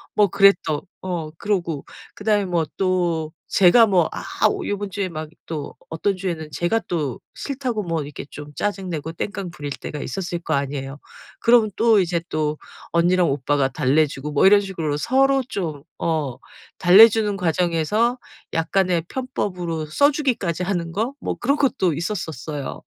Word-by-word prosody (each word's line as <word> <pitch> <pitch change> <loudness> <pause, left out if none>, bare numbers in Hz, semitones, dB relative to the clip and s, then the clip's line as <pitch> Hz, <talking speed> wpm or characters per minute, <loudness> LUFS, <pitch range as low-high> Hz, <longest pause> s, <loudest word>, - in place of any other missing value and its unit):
뭐 210 -1 +5
그래 200 +2 +6 0.2
또. 150 -2 0 0.2
어 175 -4 -3
그러고 175 -8 -2 0.3
그 205 - -12
다음에 210 -2 +3
뭐 175 -3 0
또 175 -4 0 0.2
제가 220 +5 +6
뭐 180 -5 +3
아 - - -5 0.5
요번 205 0 -3
주에 200 -1 -2
막 155 -3 -6 0.2
또 155 -3 -5 0.2
어떤 185 +4 -1
주에는 170 -5 -4
제가 175 +9 0
또 150 -8 -2
싫다고 255 -6 -3
뭐 165 -4 -2
이렇게 145 -1 -8
좀 150 0 -9
짜증내고 180 -5 -3
땡깡 190 +1 -4
부릴 145 -3 -6
때가 150 - -6
있었을 175 0 -4
거 170 - -1
아니에요. 140 0 -3 0.4
그러면 235 -3 +4
또 225 -3 +5
이제 170 -1 0
또 155 -1 -1 0.3
언니랑 175 0 +3
오빠가 140 0 +1
달래주고 145 +2 0
뭐 145 - +4
이런 200 +1 +8
식으로 170 -7 -3
서로 270 - +3
좀 160 - -4 0.2
어 155 -6 -1 0.4
달래주는 210 +3 +7
과정에서 180 +7 +1 0.4
약간의 175 +1 +1
편법으로 180 -11 -3
써 285 - +3
주기까지 225 - -1
하는 175 -3 -2
거 220 +9 -1
뭐 - - -2
그런 280 +4 +2
것도 220 - +1
있었었어요. 160 - -4
175 Hz, 310 characters per minute, -22 LUFS, 155-205 Hz, 0.5 s, 이런